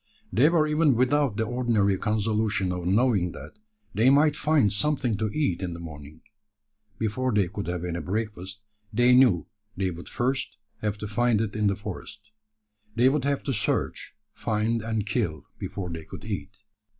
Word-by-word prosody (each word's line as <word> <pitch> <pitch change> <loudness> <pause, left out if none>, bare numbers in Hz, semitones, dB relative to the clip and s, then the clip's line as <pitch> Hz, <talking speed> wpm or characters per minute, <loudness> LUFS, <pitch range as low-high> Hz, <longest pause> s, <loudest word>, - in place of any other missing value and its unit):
They 135 +7 +5
were 165 -2 +3
even 150 -3 +3
without 130 -1 +2
the 110 - +1
ordinary 115 -4 +1
consolation 105 -2 0
of 90 -1 -3
knowing 100 -3 +2
that 75 +6 -11 0.3
they 115 +5 +4
might 145 +2 +5
find 145 -10 +2
something 125 0 0
to 110 +1 -1
eat 120 - 0
in 90 -2 -3
the - - -8
morning. 75 -2 -10 0.8
Before 125 +4 -1
they 105 -4 +2
could 100 +2 -5
have 90 0 -3
any 85 0 -3
breakfast, 100 +1 -4 0.3
they 120 +3 +4
knew 125 -9 +5 0.3
they 95 -1 0
would 85 +1 -9
first 130 +3 -1 0.2
have 105 -1 -1
to 105 - -5
find 115 +1 +2
it 105 -2 -2
in 105 -1 +2
the 100 - +2
forest. 105 +1 -8 0.6
They 120 +2 +5
would 140 -1 0
have 140 -1 0
to 135 - -1
search, 105 - -2 0.2
find, 110 +1 0
and 110 -2 -2
kill, 85 - -2
before 90 -3 -5
they 80 -1 -6
could 80 - -10
eat. 100 -2 -5
105 Hz, 175 wpm, -26 LUFS, 95-125 Hz, 0.8 s, They